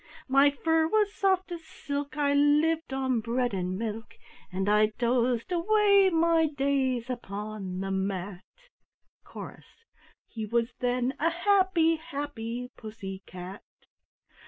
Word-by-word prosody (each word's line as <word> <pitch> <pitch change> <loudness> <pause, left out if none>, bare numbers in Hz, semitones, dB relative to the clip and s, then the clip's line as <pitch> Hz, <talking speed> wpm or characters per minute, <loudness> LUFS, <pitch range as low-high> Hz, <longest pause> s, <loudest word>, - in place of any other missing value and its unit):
My 275 +2 +5
fur 320 +3 +1
was 420 +2 +2
soft 380 -1 +1
as 335 -1 -6
silk, 285 -1 -5
I 285 -1 +2
lived 300 +2 +3
on 260 -2 0
bread 240 +1 -1
and 185 -1 -2
milk, 225 +1 -5 0.4
And 190 +2 -2
I 210 +1 +5
dozed 240 +2 +1
away 400 +2 +4
my 330 -1 +3
days 270 -4 0
upon 205 -5 -5
the 195 0 -3
mat!" 190 -1 -3 0.8
Chorus 460 - -11 0.4
("He 220 -2 -6
was 235 +2 0
then 250 +1 0
a 330 - +3
happy, 345 -2 +3
happy 260 -6 -5
Pussy 200 -4 -8
cat!") 185 +2 -8
260 Hz, 125 wpm, -28 LUFS, 215-325 Hz, 0.8 s, My